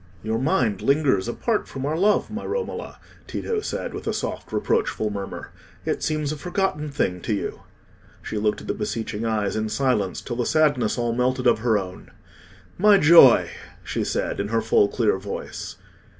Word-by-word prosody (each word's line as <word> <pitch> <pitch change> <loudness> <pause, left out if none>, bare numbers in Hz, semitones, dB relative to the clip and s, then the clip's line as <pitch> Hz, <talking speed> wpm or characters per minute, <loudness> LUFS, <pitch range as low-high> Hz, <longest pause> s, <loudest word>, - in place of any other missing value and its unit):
"Your 110 +1 -1
mind 125 -6 +1
lingers 135 -9 +2
apart 215 - -1
from 135 0 -5
our 150 +2 -1
love, 205 +6 +2
my 220 +2 -5
Romola," 470 +2 -4 0.3
Tito 450 -2 -2
said, - - -4
with - - -7
a - - 0
soft - - -4
reproachful 420 - 0
murmur. 100 -1 -6 0.3
"It - - -1
seems 155 -2 -1
a 155 - -4
forgotten 175 -2 -2
thing 90 -10 -1
to 105 - -1
you." - - -4 0.6
She 105 - -3
looked 105 0 0
at - - -11
the - - 0
beseeching 110 0 -3
eyes 105 -2 -1
in 110 0 -1
silence, 105 -7 0
till 120 -3 -6
the 120 - 0
sadness 145 -9 +2
all 120 -1 0
melted 125 +1 +1
out - - +8
of - - -1
her 110 -1 +2
own. 95 -2 -7 0.7
"My 205 +1 +6
joy!" 155 -7 +7 0.3
she - - -2
said, - - -2
in 100 - -1
her 115 +2 +1
full 110 -2 +3
clear 105 -2 +1
voice. 100 +1 -6
120 Hz, 180 wpm, -24 LUFS, 105-155 Hz, 0.7 s, out